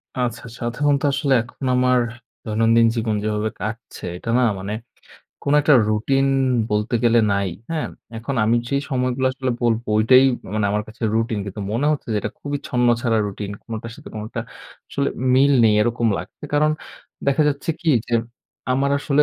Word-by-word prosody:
আচ্ছা, 125 Hz, -, -8 dB
আচ্ছা। 120 Hz, 0 st, -6 dB, 0.2 s
সাধারণতো 140 Hz, +4 st, 0 dB
আসলে 140 Hz, 0 st, 0 dB
এখন 130 Hz, +3 st, -10 dB
আমার 125 Hz, 0 st, +3 dB, 0.4 s
দৈনন্দিন 115 Hz, +1 st, +3 dB
জীবন 110 Hz, -2 st, 0 dB
যেভাবে 105 Hz, 0 st, -1 dB
কাটছে 110 Hz, +3 st, -6 dB
এটা 115 Hz, -, -5 dB
না 125 Hz, -, +3 dB, 0.2 s
মানে 100 Hz, +2 st, -4 dB, 0.7 s
কোন 140 Hz, -, 0 dB
একটা 150 Hz, 0 st, +5 dB
রুটিন 135 Hz, +6 st, +1 dB, 0.4 s
বলতে 105 Hz, +3 st, 0 dB
গেলে 120 Hz, 0 st, +5 dB
নাই। 100 Hz, -1 st, 0 dB, 0.2 s
হ্যাঁ? 160 Hz, -2 st, -1 dB, 0.3 s
এখন 120 Hz, +5 st, -4 dB
আমি 115 Hz, +2 st, +3 dB
যে 140 Hz, -, -1 dB, 0.2 s
সময়গুলো 130 Hz, 0 st, 0 dB
আসলে 130 Hz, 0 st, -2 dB
বলব 115 Hz, -1 st, +2 dB
ঐটাই 125 Hz, +5 st, +6 dB, 0.3 s
মানে 110 Hz, -, +1 dB
আমার 105 Hz, +1 st, 0 dB
কাছে 110 Hz, +2 st, -13 dB
রুটিন। 115 Hz, -1 st, 0 dB
কিন্তু 100 Hz, +1 st, -6 dB
মনে 125 Hz, +6 st, +1 dB
হচ্ছে 150 Hz, -, -4 dB
যে -, -, +1 dB
এটা -, -, -3 dB
খুবই 145 Hz, 0 st, -3 dB
ছন্ন 125 Hz, -1 st, +1 dB
ছাড়া 115 Hz, -3 st, +1 dB
রুটিন 100 Hz, 0 st, -5 dB
কোনটার 115 Hz, 0 st, -6 dB
সাথে 150 Hz, -, -11 dB
কোনটা 110 Hz, +2 st, -5 dB, 0.5 s
আসলে 140 Hz, -, -1 dB, 0.3 s
মিল 140 Hz, +2 st, +5 dB
নেই 110 Hz, -1 st, +5 dB
এরকম 115 Hz, +1 st, +1 dB
লাগছে। -, -, -9 dB
কারণ 150 Hz, +1 st, +4 dB, 0.6 s
দেখা 140 Hz, +2 st, +3 dB
যাচ্ছে 145 Hz, +3 st, -2 dB
কি 170 Hz, -, -2 dB, 0.2 s
যে 120 Hz, -, -1 dB, 0.6 s
আমার 140 Hz, +2 st, +1 dB
আসলে 145 Hz, 0 st, +3 dB
120 Hz, 170 wpm, -21 LUFS, 110-135 Hz, 0.7 s, ঐটাই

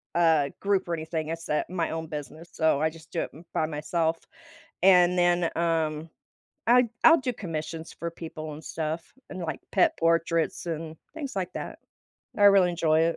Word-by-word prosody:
uh, 160 Hz, -4 st, +4 dB
group 200 Hz, -2 st, +1 dB
or -, -, 0 dB
anything, 160 Hz, -1 st, -3 dB
it's, 165 Hz, +1 st, -5 dB
uh, 150 Hz, -, +1 dB
my 175 Hz, -2 st, -1 dB
own 160 Hz, 0 st, -4 dB
business, 155 Hz, +2 st, -8 dB
so 160 Hz, -3 st, +2 dB
I 160 Hz, -, +3 dB
just 160 Hz, 0 st, -15 dB
do 165 Hz, -, -1 dB
it -, -, -4 dB
m 160 Hz, +4 st, -14 dB
by 155 Hz, -, +1 dB
myself, 160 Hz, +2 st, -1 dB, 0.7 s
and 180 Hz, -1 st, +6 dB
then, 175 Hz, 0 st, +3 dB
um, 165 Hz, -2 st, 0 dB, 0.6 s
then 240 Hz, +2 st, +6 dB
I -, -, -7 dB, 0.2 s
I'll 325 Hz, -1 st, +6 dB
do 250 Hz, -1 st, -1 dB
commissions 160 Hz, -4 st, -5 dB
for 170 Hz, -, -5 dB
people 160 Hz, -2 st, -7 dB
and 155 Hz, -, -11 dB
stuff, 160 Hz, +1 st, -4 dB, 0.2 s
and, 185 Hz, -, -6 dB
like, 160 Hz, -4 st, -4 dB
pet 185 Hz, -, +3 dB
portraits 165 Hz, 0 st, +1 dB
and 160 Hz, -1 st, -4 dB, 0.2 s
things 295 Hz, -4 st, -5 dB
like 185 Hz, -1 st, -2 dB
that. -, -, -6 dB, 0.6 s
I 205 Hz, -, +5 dB
really 195 Hz, -3 st, +7 dB
enjoy 160 Hz, -2 st, +2 dB
it. 165 Hz, 0 st, +2 dB
165 Hz, 185 wpm, -27 LUFS, 160-175 Hz, 0.7 s, really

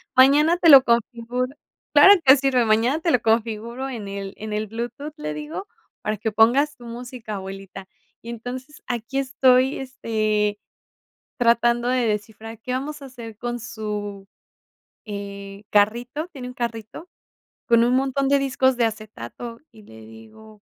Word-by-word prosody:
Mañana 290 Hz, +6 st, +5 dB
te 345 Hz, -2 st, +4 dB
lo 275 Hz, -3 st, +10 dB
configuro, 240 Hz, +2 st, -1 dB, 0.4 s
claro 395 Hz, -1 st, +8 dB
que 265 Hz, 0 st, +8 dB
sirve, 265 Hz, -3 st, +2 dB
mañana 230 Hz, +7 st, +2 dB
te 330 Hz, 0 st, 0 dB
lo 250 Hz, -, +3 dB
configuro 230 Hz, +3 st, -1 dB
en 225 Hz, -6 st, -6 dB
el 195 Hz, -1 st, -6 dB
en 215 Hz, 0 st, -7 dB
el 210 Hz, +1 st, -2 dB
Bluetooth", 240 Hz, +7 st, -6 dB
le 150 Hz, -, -4 dB
digo: 155 Hz, +6 st, -6 dB, 0.3 s
"Para 215 Hz, 0 st, -2 dB
que 220 Hz, +1 st, -3 dB
pongas 260 Hz, +8 st, +4 dB
tu 245 Hz, -, -14 dB
música, 235 Hz, -2 st, -7 dB
abuelita". 195 Hz, 0 st, -8 dB, 0.3 s
Y 235 Hz, -, -10 dB
entonces 250 Hz, +5 st, -8 dB
aquí 240 Hz, +2 st, -4 dB
estoy, 260 Hz, 0 st, +3 dB
este, 215 Hz, -5 st, -1 dB, 0.8 s
tratando 240 Hz, 0 st, +2 dB
de 250 Hz, -1 st, +1 dB
descifrar 220 Hz, +1 st, -4 dB
qué 250 Hz, +2 st, -5 dB
vamos 290 Hz, +3 st, -4 dB
a -, -, -8 dB
hacer 235 Hz, -5 st, -10 dB
con 240 Hz, +1 st, -4 dB
su, 210 Hz, -3 st, -6 dB, 0.8 s
eh, 200 Hz, -1 st, -8 dB
carrito, 240 Hz, +9 st, +1 dB
tiene 260 Hz, -7 st, -8 dB
un 250 Hz, -, -9 dB
carrito, 235 Hz, -, -5 dB, 0.6 s
con 235 Hz, -1 st, +5 dB
un 245 Hz, +1 st, +3 dB
montón 270 Hz, +1 st, 0 dB
de 280 Hz, 0 st, +4 dB
discos 265 Hz, -1 st, +1 dB
de 240 Hz, -, +2 dB
acetato, 220 Hz, -, -6 dB
y 215 Hz, -, -16 dB
le 110 Hz, -, -14 dB
digo: 115 Hz, -, -15 dB
235 Hz, 155 wpm, -23 LUFS, 215-260 Hz, 0.8 s, lo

